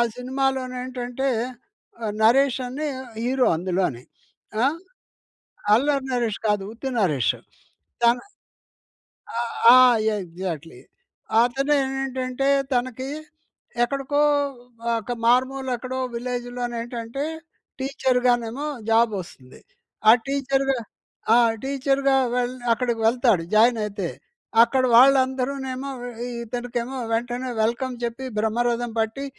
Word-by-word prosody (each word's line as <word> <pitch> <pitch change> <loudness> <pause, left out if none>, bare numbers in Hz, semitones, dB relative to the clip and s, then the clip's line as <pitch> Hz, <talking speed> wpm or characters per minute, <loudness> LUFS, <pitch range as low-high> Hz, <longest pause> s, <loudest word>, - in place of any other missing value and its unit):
సినిమాలోనేంటంటే 255 0 -2 0.9
'నరేష్' 260 +4 +4
అని 295 +5 -3 0.4
హీరో 255 +1 +2
అందులోని. 175 -7 -1 0.6
ఆహ్, 285 +5 +2 1.0
'అల్లరి 275 +4 +3
నరేష్' 235 -4 -1
కాదు 205 -2 +1
ఉత్తి 255 +4 -5
'నరేష్' 150 - +2 0.7
తన 235 +1 +6 1.6
ఆ! - - +9 0.4
ఎగ్జాక్ట్లీ. 170 -3 -6 0.6
అతను 275 +4 +1
ఏంటంటే, 265 0 -2 0.3
తనకి 255 +1 -2 0.7
ఎక్కడికో 275 +3 0 0.8
ఒక 220 +3 -7
మారుమూల 260 +2 +2
ఎక్కడో 260 +2 -5 0.2
విలేజ్‌‌‌లోనేంటంటే, 240 +1 -4 0.5
టీచర్‌గానేమో 250 0 0 0.2
జాబ్ 225 0 +4
వస్తుంది. 130 -7 -15 0.5
ఆ - - +12 0.2
టీచర్‌గా 275 -1 0 0.6
ఆ! - - +7 0.3
టీచర్‌గా 275 0 +1 0.2
వెళ్ 250 0 0 0.2
అక్కడికి 235 -1 -1
వెళ్తాడు 230 -7 +3
జాయిన్ 230 +2 +5
అయితే. 205 -1 -4 0.6
అక్కడ 255 +2 +1
వాళ్ళందరూనేమో 265 +1 +3 0.5
ఇతనికేమో 240 +2 -4 0.2
వెంటనే 245 +2 -2
వెల్‌కమ్ 245 +3 -1
చెప్పి 235 +3 -3
బ్రహ్మరథం 235 +2 0
పట్టి 225 +5 -2
250 Hz, 85 wpm, -23 LUFS, 230-265 Hz, 1.6 s, ఆ